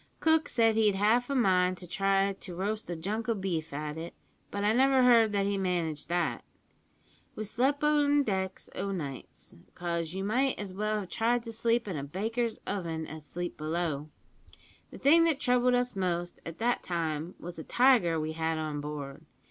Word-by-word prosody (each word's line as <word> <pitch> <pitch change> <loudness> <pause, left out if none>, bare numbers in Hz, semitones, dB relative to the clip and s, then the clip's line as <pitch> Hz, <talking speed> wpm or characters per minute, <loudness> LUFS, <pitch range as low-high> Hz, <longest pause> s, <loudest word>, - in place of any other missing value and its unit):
Cook 320 0 +3
said 225 -2 +3
he'd 215 -2 +3
half 225 +6 +2
a 280 - 0
mind 185 -6 +3
to 180 - -8
try 195 +2 +1
to 185 -2 -8
roast 210 +3 -3
a 175 - -2
junk 215 +7 -3
o' 230 - +2
beef 175 -5 -3
at 150 +2 -4
it, 170 +1 -7 0.3
but 200 0 -3
I 210 +1 +3
never 265 +1 +4
heard 230 -3 +6
that 200 -1 +1
he 200 0 0
managed 170 -5 -2
that. 175 -1 0 0.9
We 215 - -4
slep' 265 +7 0
on 290 -1 +4
deck 190 -4 -2
o' 200 - -3
nights, 145 -8 -7 0.2
'cause 170 -1 -3
you 190 - -2
might 255 +6 +1
as 200 -3 -6
well 215 +2 -1
have 190 - -9
tried 235 +1 +1
to 230 -1 -7
sleep 230 +1 +1
in 185 -6 -3
a 140 - -4
baker's 220 - -2
oven 165 -5 -3
as 155 0 -8
sleep 175 +4 -5
below. 155 -1 -2 0.8
The - - -10
thing 320 +5 +6
that 315 -4 +1
troubled 250 0 +3
us 245 -1 0
most 175 -2 -2
at 165 0 -7
that 240 +1 +1
time 165 -1 -3
was 175 -1 -8
a - - -5
tiger 235 - +4
we 155 0 -2
had 160 0 -1
on 155 -2 -3
board. 145 0 -6
195 Hz, 190 wpm, -30 LUFS, 165-230 Hz, 0.9 s, heard